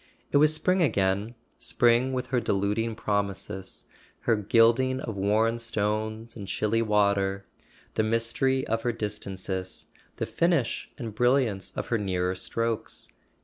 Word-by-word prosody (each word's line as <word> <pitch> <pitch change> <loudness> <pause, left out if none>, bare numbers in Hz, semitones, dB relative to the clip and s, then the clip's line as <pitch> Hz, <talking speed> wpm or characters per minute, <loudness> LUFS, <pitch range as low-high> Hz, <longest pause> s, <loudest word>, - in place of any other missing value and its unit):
It - - +4
was 150 +1 +6
spring 180 +4 +2
again, 100 - +1 0.2
spring 120 +1 +3
with 130 -1 -2
her 125 - +4
deluding 105 +1 0
promises—her 100 +2 -3
gilding 115 +5 +3
of 115 -5 -5
worn 110 +4 +2
stones 110 0 -2
and 100 -4 -7
chilly 110 +4 +1
water, 100 -2 +1 0.5
the - - +1
mystery 115 +4 +1
of 115 +1 -1
her 120 0 0
distances, 95 -4 -4 0.3
the - - -2
finish 165 -9 0
and 115 -5 -5
brilliance 120 -4 +1
of - - -4
her 115 - +1
nearer 90 -2 0
strokes. 115 +4 -2
110 Hz, 130 wpm, -27 LUFS, 100-120 Hz, 0.5 s, was